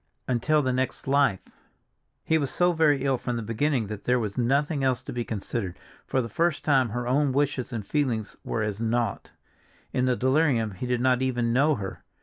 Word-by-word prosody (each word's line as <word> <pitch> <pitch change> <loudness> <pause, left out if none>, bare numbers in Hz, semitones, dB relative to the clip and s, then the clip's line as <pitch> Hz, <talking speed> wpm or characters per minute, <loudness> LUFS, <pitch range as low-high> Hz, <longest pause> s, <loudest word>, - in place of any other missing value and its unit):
Until 145 +5 +2
the 130 -1 0
next 130 +1 -2
life! 135 -8 +2 0.8
He 160 0 +2
was 140 -3 -1
so 180 0 +2
very 150 -4 +3
ill 135 -2 +1
from 125 - -3
the 115 - -3
beginning 115 +3 0
that 105 0 -7
there 125 0 +3
was 105 -4 -3
nothing 140 +4 +1
else 130 -1 +1
to - - -7
be 120 -1 -2
considered; 105 -3 -4 0.3
for 130 - +1
the - - -4
first 170 +5 0
time 135 -5 +3
her 120 +3 -3
own 140 +2 +2
wishes 140 -2 0
and 110 -4 -4
feelings 120 -7 -1
were 110 - -2
as 105 0 -3
naught. 115 +1 -1 0.6
In 125 - +1
the 125 -1 +2
delirium 130 -4 +2
he 95 +6 -5
did 125 -1 0
not 130 0 +3
even 120 -3 0
know 145 +4 +3
her. 100 -5 -6
125 Hz, 200 wpm, -26 LUFS, 115-140 Hz, 0.8 s, very